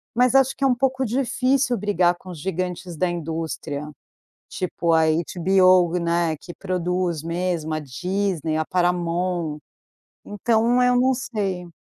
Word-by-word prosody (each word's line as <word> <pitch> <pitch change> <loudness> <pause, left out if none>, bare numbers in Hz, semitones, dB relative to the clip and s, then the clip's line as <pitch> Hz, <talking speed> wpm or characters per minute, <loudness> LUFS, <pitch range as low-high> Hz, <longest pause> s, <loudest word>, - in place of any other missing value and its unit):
mas 250 +1 +3
acho 270 0 +4
que 275 - -5
é - - +5
um 250 - +3
pouco 260 +1 0
difícil 255 +1 +1
brigar 180 -3 +2
com 185 +1 -14
os 170 -4 -8
gigantes 180 0 -4
da 180 +1 +1
indústria, 160 -3 -4 0.6
tipo 170 -2 -1
a 160 0 +4 0.3
HBO, 185 -1 +4
né, 170 -1 0
que 175 - -11
produz 180 -3 -2
mesmo 170 -2 -2
a 155 - -1
Disney, 165 +3 -2
a 160 - 0
Paramount, 175 -2 -1 0.7
então 230 +4 +1
eu 250 0 +4
não 260 +1 +3
sei. 195 -8 -3
180 Hz, 140 wpm, -23 LUFS, 170-220 Hz, 0.7 s, é